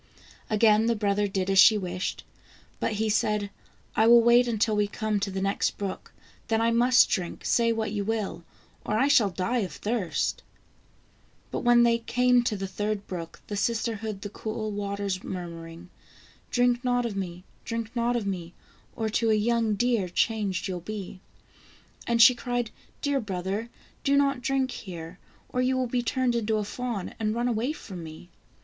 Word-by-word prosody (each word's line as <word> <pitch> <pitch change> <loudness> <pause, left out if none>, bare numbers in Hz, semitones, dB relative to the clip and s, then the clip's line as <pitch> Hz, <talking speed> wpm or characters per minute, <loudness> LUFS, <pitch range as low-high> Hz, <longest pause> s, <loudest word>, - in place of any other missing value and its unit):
Again 215 0 +4
the 235 - +2
brother 205 -1 +1
did 190 -1 -2
as 195 - +4
she 215 +1 +8
wished, 185 -2 -4 0.6
but - - -1
he 220 +1 0
said: 210 -1 0 0.2
" - - -34
I 220 - +4
will 235 0 +8
wait 240 +1 +5
until 220 -1 +1
we 210 0 +2
come 215 0 -1
to 200 - -2
the 190 0 -3
next 195 +1 0
brook, 200 -2 -5 0.4
then 225 -1 +1
I 230 +1 +2
must 245 +2 +5
drink, 180 -4 -3
say 230 -1 +3
what 220 -2 -1
you 205 -1 -2
will, 210 -5 -3 0.4
or 215 - -1
I 265 +5 +3
shall 250 -8 +5
die 195 +7 -1
of 185 -8 -3
thirst." 210 0 -1 1.1
But - - -2
when 240 -1 +5
they 235 0 +3
came 250 +1 +3
to 220 - 0
the 195 - -3
third 205 +1 -3
brook, 170 -3 -7
the 205 - -5
sister 225 +2 0
heard 215 -2 -6
the 205 - -6
cool 215 0 -4
waters 200 -2 -3
murmuring: 170 -1 -7 0.3
" - - -28
Drink 245 0 +2
not 245 -1 +1
of 225 -4 -3
me! 180 -2 -5 0.2
drink 230 0 -4
not 240 +1 +1
of 230 -4 -1
me, 175 -3 -4 0.4
Or 225 - -1
to 225 +1 +1
a 215 - +4
young 225 0 +1
deer 235 -4 +1
changed 200 -1 0
you'll 185 -2 -3
be." 195 -1 -7 0.9
And 235 0 +1
she 230 +2 +9
cried: 245 -2 -3 0.2
" - - -34
Dear 285 -1 +1
brother, 200 +1 -3 0.3
do 280 0 +3
not 275 -2 +2
drink 265 +1 0
here, 170 -2 -8 0.3
or 250 - -1
you 260 +1 +1
will 255 - +1
be 245 0 -1
turned 250 +1 0
into 220 -2 0
a 210 - -1
fawn, 230 -2 -4
and 215 0 0
run 240 +1 0
away 240 +3 0
from 190 - -8
me." 160 +2 -11
215 Hz, 190 wpm, -27 LUFS, 195-235 Hz, 1.1 s, she